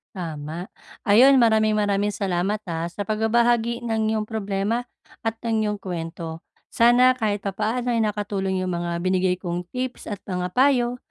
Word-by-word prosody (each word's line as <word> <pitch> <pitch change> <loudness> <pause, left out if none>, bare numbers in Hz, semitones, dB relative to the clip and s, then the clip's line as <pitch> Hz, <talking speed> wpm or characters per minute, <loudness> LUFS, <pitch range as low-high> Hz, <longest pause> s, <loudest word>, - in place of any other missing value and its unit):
Tama. 160 -1 -5 0.4
Ayun, 255 +6 +7
maraming-maraming 215 -3 +3
salamat, 195 +1 -1
ah, 170 -1 -3
sa 200 +4 -5
pagbabahagi 235 +2 +1
ng 220 -1 0
'yong 215 - -2
problema 210 +1 -1 0.4
at 225 0 -2
ng 220 -2 +1
iyong 210 - -2
kuwento. 165 -3 -6 0.3
Sana 245 +2 +5
kahit 210 -3 -1
papaano 220 +5 -1
ay 230 - +2
nakatulong 205 -3 -1
yung 185 - -2
mga 170 0 -2
binigay 185 0 +1
kong 175 -1 -3
tips 255 0 -4
at 200 -2 -5
mga 180 -1 -3
payo 250 -2 +3
210 Hz, 145 wpm, -23 LUFS, 185-230 Hz, 0.4 s, Ayun